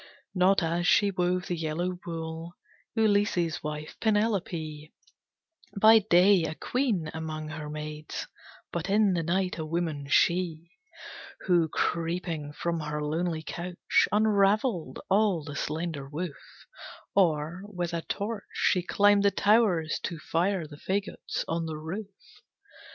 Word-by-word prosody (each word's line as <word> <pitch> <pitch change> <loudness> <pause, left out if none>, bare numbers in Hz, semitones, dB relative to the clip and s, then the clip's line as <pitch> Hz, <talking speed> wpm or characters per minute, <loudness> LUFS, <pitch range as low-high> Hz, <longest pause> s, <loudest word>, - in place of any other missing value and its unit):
Not 185 0 +3
as 170 +2 0
she 200 -1 +4
wove 180 -1 0
the 175 - -2
yellow 170 +3 -2
wool, 165 0 -5 0.4
Ulysses' 205 -6 +2
wife, 150 0 -5
Penelope; 180 -8 -1 0.9
By 220 +2 +8
day 195 -1 +5
a 160 0 -4
queen 215 - -1
among 155 -1 -5
her 155 -1 -6
maids, 150 0 -6 0.5
But 170 +2 -3
in 205 -1 +4
the 170 - 0
night 180 +2 -1
a - - -2
woman, 160 -4 -2
she, 170 0 +2 0.7
Who, 175 -3 +2
creeping 165 -2 -2
from 170 +2 -2
her 150 -1 -3
lonely 160 +1 -1
couch, 175 +2 0
Unraveled 205 - +2
all 195 -4 +2
the 145 -1 -7
slender 150 -2 -3
woof; 155 0 -7 0.5
Or, 165 -2 +1
with 180 -4 -4
a 170 - -1
torch, 205 +4 -4
she 185 - +2
climbed 205 +3 +4
the 200 - +5
towers, 200 -7 +2
To 170 - -4
fire 170 +3 0
the 145 -1 -11
fagots 195 +5 -3
on 165 0 -1
the 155 -1 -4
roof! 185 +7 -5
170 Hz, 130 wpm, -28 LUFS, 155-195 Hz, 0.9 s, By